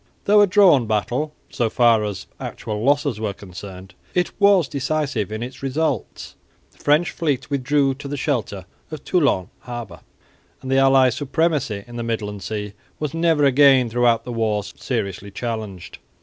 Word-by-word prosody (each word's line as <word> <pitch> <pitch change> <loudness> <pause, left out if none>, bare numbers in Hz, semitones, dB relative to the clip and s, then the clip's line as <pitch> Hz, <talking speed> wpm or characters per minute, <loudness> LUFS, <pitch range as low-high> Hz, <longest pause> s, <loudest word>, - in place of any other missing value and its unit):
Though 205 +1 +6
a 205 - +5
drawn 180 - +5
battle, 120 +8 -1 0.2
so 115 -2 0
far 115 -1 +4
as 100 -2 -4
actual 105 0 -5
losses 145 -3 +1
were 105 -2 -2
concerned, 95 0 -10 0.2
it 180 -1 +1
was 200 -6 +5
decisive 140 -6 -2
in 110 +2 -4
its 125 +1 -8
results. 135 -2 -2 0.4
The - - -28
French 150 +4 +2
fleet 145 -4 -2
withdrew 140 0 +1
to 140 +1 -9
the 145 +1 -4
shelter 115 - -2 0.2
of 155 -2 -8
Toulon 140 - +1
harbour; 120 -8 -8 0.6
and 130 - -4
the 135 - +4
allies' 135 -2 +5
supremacy 145 -7 -1
in 120 0 -10
the 120 - -3
midland 105 -3 -3
sea 105 +1 -5 0.3
was 150 -1 -3
never 165 -3 +2
again 135 -3 +5
throughout 120 -1 +2
the 125 - -6
war 110 -3 0
seriously 100 0 -4
challenged. 105 -4 -6
125 Hz, 160 wpm, -21 LUFS, 105-145 Hz, 0.6 s, Though